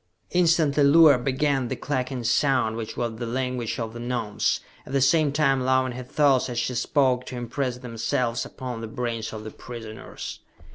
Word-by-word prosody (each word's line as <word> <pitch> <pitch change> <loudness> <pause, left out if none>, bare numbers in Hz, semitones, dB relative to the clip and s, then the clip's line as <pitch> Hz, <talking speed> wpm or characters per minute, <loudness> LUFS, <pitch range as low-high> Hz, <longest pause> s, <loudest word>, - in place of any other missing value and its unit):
Instantly 160 -5 +3
Luar 145 -1 +7
began 135 0 0
the - - -3
clucking 130 -3 -3
sound 120 -1 +2
which 115 -1 -6
was 115 -2 -2
the 120 - -3
language 125 -1 -2
of 110 -1 -4
the 120 - -7
Gnomes, 120 -3 -1 0.2
at 130 - -10
the 140 - +3
same 145 +2 +3
time 135 -3 +2
allowing 130 0 +2
her 125 +1 -6
thoughts 135 0 +2
as 120 - -4
she 125 - 0
spoke 125 0 +2
to 125 - -6
impress 125 +1 -3
themselves 115 0 -2
upon 125 -3 -6
the 115 - -5
brains 115 -1 -3
of 110 -1 -7
the 110 - -7
prisoners. 115 -2 -8
125 Hz, 180 wpm, -25 LUFS, 115-135 Hz, 0.2 s, Luar